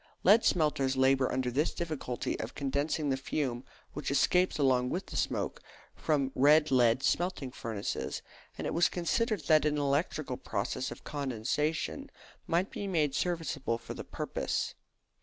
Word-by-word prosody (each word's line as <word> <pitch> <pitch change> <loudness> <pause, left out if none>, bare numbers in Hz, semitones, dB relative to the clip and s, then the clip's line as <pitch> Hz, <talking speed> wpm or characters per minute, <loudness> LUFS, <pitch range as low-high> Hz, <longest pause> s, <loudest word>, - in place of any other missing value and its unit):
Lead 210 +4 +6
smelters 140 -5 +2
labour 130 0 +3
under 130 -1 -1
this 145 +6 0
difficulty 155 -7 -3
of 110 +4 -5
condensing 145 +1 -1
the 135 - +1
fume 130 -2 -2 0.3
which - - -4
escapes 180 +6 +3
along 130 -3 +3
with 185 +7 -2
the - - -9
smoke - - -1 0.3
from 140 -4 0
red 150 +3 +5
lead 125 0 +4
smelting 175 -7 0
furnaces; 110 -4 -4 0.3
and - - -4
it - - -1
was 170 - +4
considered 210 +3 0
that 155 +1 +4
an 150 0 +1
electrical 140 -1 0
process 125 +5 -3
of - - -9
condensation 150 - -2 0.4
might 175 +4 +1
be 200 - -4
made 155 -7 +1
serviceable 165 -8 -1
for 115 - -8
the - - -7
purpose. - - -3
145 Hz, 150 wpm, -31 LUFS, 130-165 Hz, 0.4 s, Lead